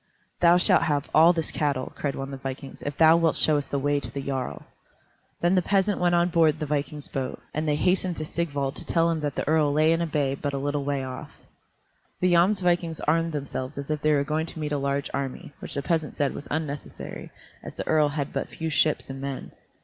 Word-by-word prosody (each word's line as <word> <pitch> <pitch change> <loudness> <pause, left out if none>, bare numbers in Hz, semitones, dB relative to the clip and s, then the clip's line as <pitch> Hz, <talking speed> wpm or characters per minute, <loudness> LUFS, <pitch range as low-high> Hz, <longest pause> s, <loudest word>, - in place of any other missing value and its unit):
"Thou 175 0 +6
shalt 180 - +4
have 145 -1 -1
all 165 +2 +7
this 165 -3 -2
cattle," 140 -4 -1
cried 140 -2 -2
one 135 0 -5
of - - -8
the 135 - -5
vikings, 135 +1 -7
"if 145 0 -5
thou 160 0 +7
wilt 165 -2 +2
show 155 -1 +4
us 140 - -6
the 140 - -2
way 145 +1 +1
to - - -3
the 140 - -5
jarl." 135 -2 -3 0.8
Then 175 +2 +3
the 185 - +4
peasant 195 +2 +1
went 175 -1 +3
on 175 +1 +3
board 160 -3 +3
the 155 - -3
vikings' 145 0 -3
boat, 135 -1 -4
and 155 +1 -2
they 150 - +2
hastened 180 +2 +1
to 155 - -3
Sigvald 145 -5 -2
to - - -6
tell 170 0 +2
him 165 - -1
that 145 -2 -3
the - - -3
earl 155 -1 +3
lay 155 +2 +4
in 165 - 0
a 170 - 0
bay 145 -3 0
but 140 +1 -3
a - - -1
little 145 +1 -1
way 140 -1 -1
off. 130 -1 -8 0.8
The 180 -1 +3
Jomsvikings 175 -2 +2
armed 165 +1 +2
themselves 140 -1 -4
as 140 +1 -4
if 150 -1 -2
they 155 0 +3
were 140 -1 +2
going 155 +3 -1
to 165 - -8
meet 150 -1 -3
a 145 - 0
large 140 0 -1
army, 140 +1 -4
which - - -5
the 140 - -2
peasant 160 -2 -1
said 145 -2 0
was 145 - -8
unnecessary, 145 -2 -5 0.3
as - - -9
the - - -4
earl 155 -2 +3
had 145 -1 -3
but - - -2
few 160 -1 -4
ships 155 0 +2
and 135 0 -7
men. 140 -1 -5
150 Hz, 240 wpm, -26 LUFS, 140-165 Hz, 0.8 s, all